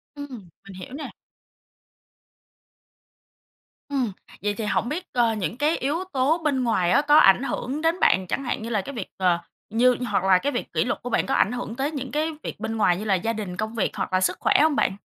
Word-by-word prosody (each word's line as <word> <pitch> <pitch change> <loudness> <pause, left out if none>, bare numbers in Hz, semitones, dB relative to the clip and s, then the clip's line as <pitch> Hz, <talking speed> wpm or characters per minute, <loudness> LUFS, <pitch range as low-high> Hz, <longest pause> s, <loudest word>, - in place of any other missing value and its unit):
Ừm, 255 -11 -9 0.2
mình 195 - -10
hiểu 185 +8 -9
nè. 300 - -7 2.8
Ừm, 260 -7 0 0.3
vậy 205 +1 0
thì 215 +1 -4
hổng 230 +3 0
biết, 345 +5 -3
ơ, 235 -2 +3
những 210 +2 -3
cái 300 +4 +1
yếu 300 +7 -1
tố 275 +5 +2
bên 270 -4 +1
ngoài 185 -7 +1
á 285 - +5
có 295 +1 +5
ảnh 195 +1 +6
hưởng 275 +2 -3
đến 330 +2 +1
bạn, 185 -1 +3
chẳng 275 - -2
hạn 245 - -2
như 230 - -5
là 215 -4 0
cái 280 +7 -8
việc, 210 - -4
ờ, 180 -2 +2 0.3
như 245 +3 +4
hoặc 190 - +1
là 190 -1 +5
cái 280 +8 -1
việc - - -4
kỷ - - +2
luật - - -2
của 245 - -5
bạn - - +1
có 270 - -1
ảnh 205 - +3
hưởng 245 -2 -5
tới 275 +4 -1
những 270 -4 -5
cái 310 +2 0
việc - - -6
bên 220 +1 -3
ngoài 180 -4 +3
như 210 - -5
là 195 -2 +3
gia 225 +6 -1
đình, 200 -5 -5
công 220 +3 -3
việc 215 - 0
hoặc - - -3
là 185 - +3
sức - - +1
khỏe - - +2
hông 310 -1 +3
bạn? 190 -8 +1
235 Hz, 235 wpm, -24 LUFS, 200-285 Hz, 2.8 s, ảnh